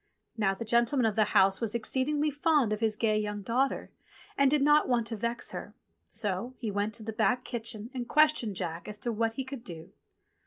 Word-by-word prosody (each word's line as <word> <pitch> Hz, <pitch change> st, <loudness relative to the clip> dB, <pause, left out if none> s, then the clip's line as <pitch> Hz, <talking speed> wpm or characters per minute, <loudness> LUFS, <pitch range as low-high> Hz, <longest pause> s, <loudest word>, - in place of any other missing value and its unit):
Now 195 Hz, -4 st, +1 dB
the 230 Hz, -, -6 dB
gentleman 235 Hz, +3 st, +2 dB
of 220 Hz, -2 st, +1 dB
the 215 Hz, -, +4 dB
house 195 Hz, 0 st, +3 dB
was 230 Hz, -1 st, -1 dB
exceedingly 290 Hz, +6 st, 0 dB
fond 290 Hz, -6 st, +2 dB
of 210 Hz, -, -3 dB
his 220 Hz, -2 st, +1 dB
gay 215 Hz, -1 st, +1 dB
young 210 Hz, -1 st, -4 dB
daughter, 255 Hz, +6 st, 0 dB, 0.4 s
and 275 Hz, -1 st, +4 dB
did 290 Hz, 0 st, +2 dB
not 295 Hz, 0 st, +4 dB
want 240 Hz, -2 st, +2 dB
to 230 Hz, -, -2 dB
vex 235 Hz, +2 st, -2 dB
her; -, -, -7 dB, 0.3 s
so 210 Hz, +5 st, -2 dB
he 225 Hz, -5 st, -3 dB
went 205 Hz, +2 st, -1 dB
into -, -, -9 dB
the -, -, -14 dB
back 250 Hz, +2 st, +2 dB
kitchen 230 Hz, -1 st, -4 dB
and 245 Hz, -2 st, -5 dB
ques 305 Hz, +1 st, +6 dB
tioned 225 Hz, -8 st, -2 dB
Jack 170 Hz, -1 st, -4 dB
as 210 Hz, 0 st, -6 dB
to 235 Hz, +3 st, -2 dB
what 225 Hz, 0 st, 0 dB
he 265 Hz, -, -3 dB
could 260 Hz, -2 st, -8 dB
do. 165 Hz, -6 st, -8 dB
230 Hz, 220 wpm, -29 LUFS, 210-260 Hz, 0.4 s, ques